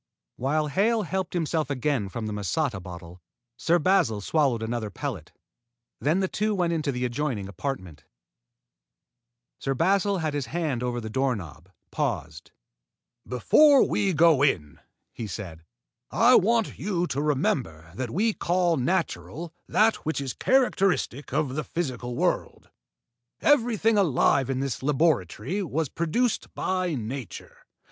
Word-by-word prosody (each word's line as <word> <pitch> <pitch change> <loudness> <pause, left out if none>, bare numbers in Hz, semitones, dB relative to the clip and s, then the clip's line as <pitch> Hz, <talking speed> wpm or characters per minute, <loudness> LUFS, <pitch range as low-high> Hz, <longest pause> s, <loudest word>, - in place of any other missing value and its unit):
While 150 +4 0
Hale 215 +8 +2
helped 190 -1 -3
himself 160 -2 -1
again 135 -6 -1
from 115 +3 -5
the 105 - -3
masata 105 - -1
bottle, 90 0 -10 0.3
Sir 165 +8 +2
Basil 175 - +2
swallowed 130 0 +1
another 110 -1 -3
pellet. 100 - -6 0.7
Then 160 +6 +1
the 190 - +1
two 215 +2 -1
went 175 -3 +1
into 155 -3 -1
the 125 -1 -2
adjoining 120 -5 -2
apartment. 95 - -6 1.5
Sir 135 0 -1
Basil, 195 +6 +2
his 145 -6 -2
hand 150 -3 -2
over 125 -1 -2
the 110 -2 -6
doorknob, 100 - -2 0.2
paused. 75 +2 -3 0.8
"Before 275 - +5
we 195 -1 +1
go 160 -3 +4
in," 75 - +1 0.3
he 115 - -5
said, 90 -5 -7 0.5
"I 240 +2 +5
want 230 +1 +3
you 180 -3 -1
to 140 -4 -2
remember 125 - -1
that 120 +5 -4
we 215 - +1
call 175 -2 +1
natural 135 - -2
that 220 +1 +3
which 160 -1 -3
is 135 -3 -3
characteristic 195 - +1
of 140 -1 0
the 155 +2 -2
physical 125 -7 -4
world. - - -2 0.7
Everything 225 -6 +3
alive 140 -6 +3
in 135 0 -1
this 135 -2 -3
laboratory 140 - 0
was 160 -4 -2
produced 195 - -1
by 185 -3 -1
nature. 125 +1 -7
145 Hz, 135 wpm, -26 LUFS, 115-180 Hz, 1.5 s, Before